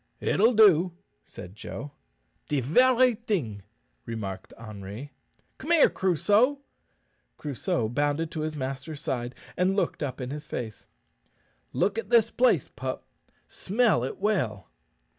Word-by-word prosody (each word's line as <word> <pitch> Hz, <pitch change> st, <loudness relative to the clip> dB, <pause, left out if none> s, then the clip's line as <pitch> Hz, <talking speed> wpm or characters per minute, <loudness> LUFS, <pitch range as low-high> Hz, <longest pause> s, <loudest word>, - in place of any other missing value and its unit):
"It'll 225 Hz, +4 st, +3 dB
do," 185 Hz, -5 st, +6 dB, 0.3 s
said 90 Hz, +1 st, -10 dB
Joe. 140 Hz, +6 st, -7 dB, 0.6 s
"De 145 Hz, -, +1 dB
very 250 Hz, -, +4 dB
ting," 180 Hz, -, -3 dB, 0.5 s
remarked 100 Hz, -5 st, -5 dB
Henri. 110 Hz, +4 st, -8 dB, 0.5 s
"Come 310 Hz, -, -7 dB
here, 335 Hz, -4 st, +6 dB
Crusoe." 205 Hz, -, +2 dB, 0.8 s
Crusoe 125 Hz, -5 st, -2 dB
bounded 145 Hz, +6 st, 0 dB
to 160 Hz, -, -5 dB
his 155 Hz, 0 st, -3 dB
master's 135 Hz, +3 st, -5 dB
side, 125 Hz, -3 st, -3 dB, 0.2 s
and 185 Hz, +2 st, +2 dB
looked 200 Hz, -, -1 dB
up 135 Hz, -3 st, -3 dB
in 125 Hz, 0 st, -4 dB
his 150 Hz, +1 st, -6 dB
face. 110 Hz, -6 st, -6 dB, 0.8 s
"Look 205 Hz, +2 st, +1 dB
at -, -, -7 dB
this 230 Hz, -2 st, +4 dB
place, 250 Hz, 0 st, +3 dB
pup; -, -, -5 dB, 0.4 s
smell 210 Hz, -, +1 dB
it 130 Hz, -, -4 dB
well." 135 Hz, -, -1 dB
150 Hz, 125 wpm, -27 LUFS, -, 0.8 s, do